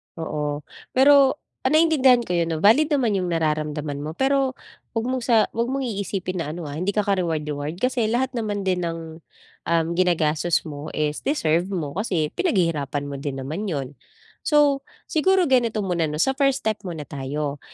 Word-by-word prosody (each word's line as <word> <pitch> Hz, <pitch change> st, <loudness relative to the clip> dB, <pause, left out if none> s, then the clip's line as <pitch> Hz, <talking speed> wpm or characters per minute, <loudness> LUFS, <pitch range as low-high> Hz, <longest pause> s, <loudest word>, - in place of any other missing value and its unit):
Oo, 150 Hz, -2 st, -3 dB, 0.3 s
pero, 275 Hz, 0 st, +6 dB, 0.3 s
ah, -, -, +3 dB
naiintindihan 270 Hz, -7 st, +5 dB
ko 180 Hz, -, -6 dB
yun, 170 Hz, -1 st, +1 dB
'no? 155 Hz, -, -4 dB
Valid 295 Hz, +9 st, +5 dB
naman 240 Hz, -6 st, +1 dB
yung 180 Hz, -, -2 dB
nararamdaman 155 Hz, -3 st, -1 dB
mo, 155 Hz, +2 st, -5 dB
pero 270 Hz, -1 st, +1 dB, 0.4 s
huwag 225 Hz, +1 st, 0 dB
mong 255 Hz, -2 st, -1 dB
sa 235 Hz, -3 st, +4 dB
huwag 235 Hz, +1 st, -1 dB
mong 270 Hz, +1 st, -2 dB
iisipin 195 Hz, -5 st, -3 dB
na 155 Hz, -1 st, -3 dB
ano, 175 Hz, -, -6 dB
ah, 145 Hz, -, -6 dB
hindi 195 Hz, +3 st, -1 dB
ka 210 Hz, -, +2 dB
ka 200 Hz, -1 st, +1 dB
reward-reward. 150 Hz, -2 st, -2 dB
Kasi 250 Hz, -3 st, +1 dB
lahat 250 Hz, +3 st, 0 dB
naman 210 Hz, -5 st, -2 dB
din 185 Hz, -1 st, 0 dB
ng, 165 Hz, -1 st, -6 dB, 0.5 s
um, 165 Hz, -1 st, +2 dB
ginagastos 170 Hz, -2 st, +2 dB
mo 150 Hz, 0 st, -7 dB
is 150 Hz, -1 st, -1 dB
deserve 175 Hz, -, +1 dB
mo, 165 Hz, -8 st, -3 dB
kasi 175 Hz, -8 st, -1 dB
pinaghihirapan 165 Hz, -, 0 dB
mo 140 Hz, -1 st, -5 dB
din 135 Hz, -1 st, -4 dB
naman 170 Hz, +10 st, -4 dB
'yon. 140 Hz, -7 st, -2 dB, 0.6 s
So, 290 Hz, -2 st, +4 dB, 0.3 s
siguro 375 Hz, +3 st, +3 dB
ganito 235 Hz, -7 st, +2 dB
muna 170 Hz, -4 st, 0 dB
'no, 150 Hz, -, -4 dB
sa 270 Hz, -, +3 dB
first 275 Hz, 0 st, +1 dB
step 215 Hz, -1 st, 0 dB
muna 160 Hz, -4 st, -5 dB
tayo. 140 Hz, +1 st, -4 dB
180 Hz, 180 wpm, -23 LUFS, 155-250 Hz, 0.6 s, pero